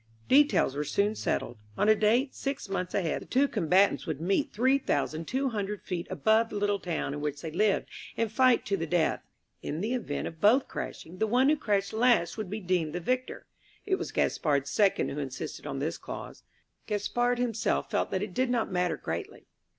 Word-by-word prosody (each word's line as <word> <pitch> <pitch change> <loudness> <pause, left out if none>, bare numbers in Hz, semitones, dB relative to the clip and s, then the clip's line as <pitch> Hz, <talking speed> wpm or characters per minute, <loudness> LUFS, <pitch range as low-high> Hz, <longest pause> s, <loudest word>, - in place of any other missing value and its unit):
Details 285 - +4
were 145 - -1
soon 200 +8 +1
settled. 120 - -2 0.2
On 205 - +2
a 215 - +8
date 230 +6 +2
six 275 -5 -4
months 185 -2 -3
ahead 175 -6 0
the - - -11
two 275 +3 +3
combatants 185 - +2
would 155 -4 -3
meet 195 - 0
three 260 +5 +3
thousand 160 - -1
two 265 +1 0
hundred 210 -2 -4
feet 175 -1 -4
above 220 +6 +2
the - - -7
little 205 0 +1
town 165 -6 -3
in 145 - -5
which 145 -1 -3
they 160 - -4
lived, 200 +5 +1 0.3
and 225 -2 0
fight 255 +1 +4
to 200 - 0
the 165 -3 -3
death. 170 -1 +1 0.4
In 155 - -4
the 220 +7 -1
event 220 - -3
of 160 0 -10
both 245 +6 +5
crashing, 180 +3 -7
the 220 - +2
one 250 +5 +3
who 305 - +4
crashed 200 -7 -1
last 235 -6 +3
would 215 -4 -5
be 210 +3 -3
deemed 175 -5 0
the 175 - -2
victor. 255 +8 -2 0.4
It 380 -2 +1
was - - -5
Gaspard's 140 -3 0
second 200 +4 +2
who 145 - -4
insisted 135 -3 -5
on - - -4
this - - -2
clause; - - -8 0.5
Gaspard 240 +4 0
himself 235 -2 -1
felt - - 0
that 190 +1 -1
it 205 -3 -6
did 255 +3 +1
not 235 -4 0
matter 180 -3 0
greatly. 80 +1 -5
205 Hz, 205 wpm, -29 LUFS, 170-240 Hz, 0.5 s, a